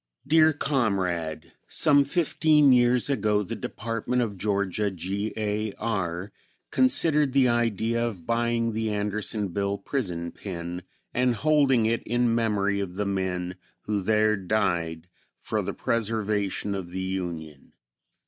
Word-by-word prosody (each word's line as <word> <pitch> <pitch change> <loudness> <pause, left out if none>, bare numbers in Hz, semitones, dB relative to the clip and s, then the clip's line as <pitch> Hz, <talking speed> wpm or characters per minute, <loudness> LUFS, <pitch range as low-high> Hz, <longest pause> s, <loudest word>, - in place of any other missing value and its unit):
Dear 155 +2 +5
Comrade: 90 - -1
Some 145 -2 +4
fifteen 150 -3 +4
years 120 0 +3
ago 105 -6 +1
the 115 +4 -5
Department 115 +3 -2
of 105 -4 -4
Georgia, 100 +1 0
G. 95 +4 -3
A. 105 -1 -2
R., 95 -4 -3 0.4
considered 160 - +3
the 135 -2 +4
idea 115 -1 +1
of 100 -8 -4
buying 115 0 0
the 110 0 -2
Andersonville 105 -1 -1
prison 90 -7 -3
pen 90 -2 -6 0.3
and 125 -1 +2
holding 140 -3 +3
it 115 +1 +1
in 120 0 +1
memory 105 -3 +1
of 95 -3 -4
the 105 +1 -1
men 95 -2 -2 0.2
who 105 -2 -2
there 110 +2 +3
died 90 -5 -1 0.3
for - - -2
the - - -3
preservation 105 -3 -1
of 95 -3 -5
the 95 +1 -4
Union. 85 -6 -5
105 Hz, 130 wpm, -26 LUFS, 95-120 Hz, 0.4 s, Dear